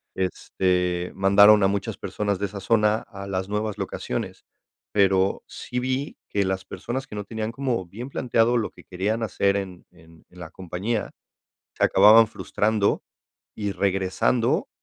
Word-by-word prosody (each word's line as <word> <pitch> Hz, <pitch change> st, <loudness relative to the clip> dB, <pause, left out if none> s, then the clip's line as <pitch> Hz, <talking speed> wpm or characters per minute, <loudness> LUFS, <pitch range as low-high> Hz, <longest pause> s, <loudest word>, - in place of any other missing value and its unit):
este, 90 Hz, -1 st, -1 dB
mandaron 100 Hz, +2 st, +6 dB
a -, -, +5 dB
muchas 100 Hz, 0 st, -2 dB
personas 100 Hz, -2 st, -2 dB
de 100 Hz, -, -1 dB
esa 100 Hz, 0 st, -8 dB
zona 105 Hz, 0 st, +3 dB
a 100 Hz, -2 st, -10 dB
las 95 Hz, -1 st, -2 dB
nuevas 105 Hz, 0 st, -2 dB
locaciones. -, -, -4 dB, 0.5 s
Pero, 95 Hz, -1 st, +2 dB
sí 125 Hz, -, -5 dB
vi 130 Hz, +3 st, -2 dB
que 100 Hz, -1 st, +1 dB
las 95 Hz, 0 st, -2 dB
personas 130 Hz, +7 st, -5 dB
que -, -, -12 dB
no 105 Hz, -1 st, -5 dB
tenían 110 Hz, +1 st, -4 dB
como 120 Hz, -6 st, -2 dB
bien 120 Hz, +9 st, -8 dB
planteado 120 Hz, -2 st, +1 dB
lo 110 Hz, -, -2 dB
que -, -, -17 dB
querían 100 Hz, +5 st, -2 dB
hacer 100 Hz, -2 st, +1 dB
en 95 Hz, -3 st, -6 dB
en 80 Hz, -2 st, -20 dB
en 90 Hz, -, -16 dB
la 85 Hz, -2 st, -8 dB
compañía, 95 Hz, +5 st, -3 dB, 0.6 s
se -, -, -2 dB
acababan 110 Hz, +3 st, +7 dB
frustrando 105 Hz, 0 st, 0 dB, 0.5 s
y 105 Hz, -2 st, -2 dB
regresando 95 Hz, +5 st, +1 dB
100 Hz, 155 wpm, -24 LUFS, 95-110 Hz, 0.6 s, acababan